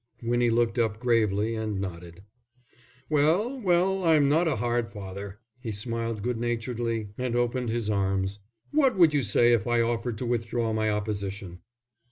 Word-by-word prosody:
Winnie 120 +1 +2
looked 115 +1 +1
up 110 -2 0
gravely 110 -3 +1
and 110 -3 -3
nodded. 90 -1 -7 0.8
"Well, 170 - +2
well, 190 0 +2
I'm 155 -4 +4
not 160 +4 +3
a 160 - +1
hard 120 0 -1
father." 100 0 -7 0.2
He 120 -3 -5
smiled 115 0 -4
good 120 -1 -1
naturedly 115 -2 -2
and 125 -2 -1
opened 120 0 0
his 115 -1 -2
arms. 95 -1 0 0.3
"What 275 -7 +3
would 165 -4 +6
you 145 - +2
say 120 +2 +4
if 115 -2 +1
I 120 0 +2
offered 115 0 -1
to 125 - -4
withdraw 115 -1 -1
my 110 0 +1
opposition?" 100 -3 -4
115 Hz, 160 wpm, -27 LUFS, 105-125 Hz, 0.8 s, would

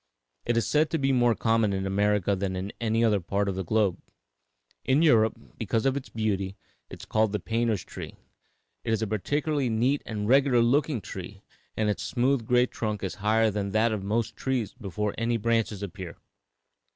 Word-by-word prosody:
It 120 - +2
is 115 - +2
said 155 +1 +2
to 165 - 0
be 135 -2 +1
more 120 -3 +3
common 115 -2 +2
in 95 0 -2
America 100 0 +1
than 95 0 -2
in 95 +2 -4
any 115 0 +1
other 105 -3 +3
part 100 +3 -1
of 100 - 0
the 95 +1 -3
globe. 100 -1 +1 0.8
In 135 +5 +3
Europe, 110 -8 +4 0.2
because 115 - -1
of 135 0 +2
its 140 - -5
beauty, 100 -3 -2 0.3
it - - -10
is - - -9
called 110 -1 +1
the 105 - 0
painter's 115 0 -1
tree. - - -8 0.7
It 110 - 0
is 110 0 0
a - - +1
particularly 140 +6 -1
neat 125 +6 +1
and 105 -2 -3
regular 130 -1 +4
looking 135 0 +1
tree, - - -8 0.3
and 110 - +1
its 105 0 -1
smooth 120 +5 0
gray 125 0 +4
trunk 105 -4 -4
is 95 - -2
higher 110 +1 +3
than 100 -1 -3
that 110 +2 +3
of 105 -2 -2
most 110 +2 -1
trees 130 -4 -2
before 105 -3 -3
any 115 0 +1
branches 115 -2 0
appear. 95 -3 -7
110 Hz, 190 wpm, -27 LUFS, 100-120 Hz, 0.8 s, Europe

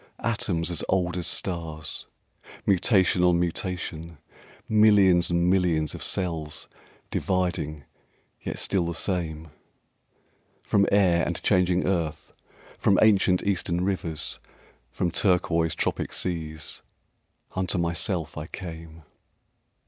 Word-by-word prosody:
The - - -17
Voice 115 - +2
Atoms 85 -6 -1
as 85 -3 -1
old 90 -2 +1
as 90 - -1
stars, 80 -4 -3 0.6
Mutation 95 -1 +3
on 90 -1 +4
mutation, 85 -2 -3 0.5
Millions 100 -5 +5
and 85 0 +2
millions 90 -5 +2
of - - -8
cells 80 -5 -2 0.4
Dividing 90 -6 -1 0.6
yet - - -5
still 90 -4 +1
the 85 - -3
same, 80 -4 -2 1.1
From 100 -1 +2
air 90 -4 +4
and 85 - -2
changing 90 -2 +2
earth, 80 -5 -2 0.5
From 100 - +3
ancient 95 -4 +4
Eastern 90 -3 0
rivers, 85 -5 -2 0.5
From 85 - -2
turquoise 85 -4 +2
tropic - - -2
seas, 80 -3 -4 0.7
Unto 95 0 0
myself 85 -2 -1
I 75 - -6
came. 80 -3 -9
85 Hz, 110 wpm, -26 LUFS, 80-95 Hz, 1.1 s, Millions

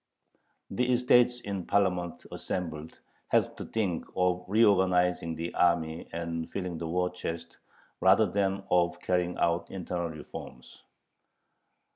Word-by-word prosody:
The 125 +6 +1
"estates 125 0 +4
in 100 -4 -5
Parliament 90 -4 0
assembled" 80 -4 -5 0.3
had - - +2
to - - -6
think 100 -7 -1
of 90 0 +1
reorganizing 90 -5 +3
the 85 +2 -4
army 85 -2 +1
and 85 0 -4
filling 90 -4 -4
the 85 - -4
war 90 +2 0
chest 85 -2 -6 0.4
rather - - +5
than 100 -1 0
of 90 0 +2
carrying 90 -1 0
out 85 0 +1
internal 90 -2 -3
reforms. 75 -5 -10
90 Hz, 120 wpm, -29 LUFS, 85-95 Hz, 0.4 s, rather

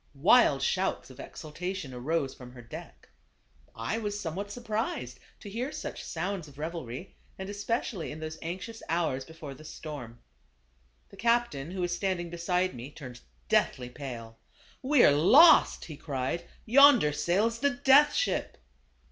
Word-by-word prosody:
Wild 145 - +5
shouts 185 -4 -1
of 130 - -15
exultation 165 -1 -6
arose 135 +3 -1
from 125 -1 -12
her 125 - -11
deck. 115 - -11 0.7
I 115 - -2
was 205 -2 -3
somewhat 195 +2 -4
surprised 215 - -3 0.2
to - - -10
hear 240 +8 -3
such - - -6
sounds 175 0 -4
of 140 -1 -16
revelry, 160 -1 -6 0.2
and 190 - -6
especially 205 -3 -3
in 155 - -8
those 155 0 -6
anxious 190 +7 -6
hours 160 -6 0
before 160 -3 -9
the 135 - -14
storm. 145 -7 -8 0.9
The 200 - -15
captain 230 -11 +1
who 185 +1 -4
was 175 0 0
stand 190 -1 -1
ing 175 -1 -6
beside 180 +2 0
me, 125 +2 -8
turned 130 -5 -10 0.3
deathly 125 -1 +1
pale. 120 -4 -8 0.4
"We 270 0 +4
are - - +7
lost," 250 - +6
he 155 -4 -9
cried; 135 +3 -3 0.2
"yonder 255 - +6
sails 190 +10 +1
the 285 +3 +3
Death 280 +1 +5
Ship!" - - -1
170 Hz, 150 wpm, -29 LUFS, 140-205 Hz, 0.9 s, are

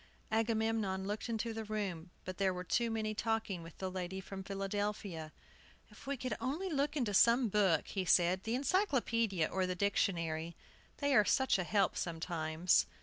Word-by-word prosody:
Agamemnon 220 -3 0
looked 210 +4 -3
into 230 0 -2
the 225 0 -4
room, 200 -6 -3 0.2
but 185 0 -6
there 190 -2 +2
were 180 - -4
too 235 +5 +1
many 220 -1 -1
talking 220 -4 -1
with 165 -1 -11
the 190 -1 -3
lady 185 0 -4
from 190 0 -7
Philadelphia. 195 -4 -3 0.6
"If - - -15
we 280 0 -1
could 250 -2 -3
only 325 +9 -2
look 290 +1 0
into 235 -7 0
some 235 +4 +5
book," 190 -6 +2
he 195 - -1
said, 180 +1 +3
"the 225 +1 -1
encyclopaedia 240 - +1
or 190 -1 -1
the 185 - -2
dictionary, 170 -4 0 0.4
they 285 -1 +1
are 210 - +7
such 265 0 +2
a - - +1
help 195 +1 +2
sometimes!" 165 0 +1
200 Hz, 170 wpm, -34 LUFS, 180-225 Hz, 0.6 s, are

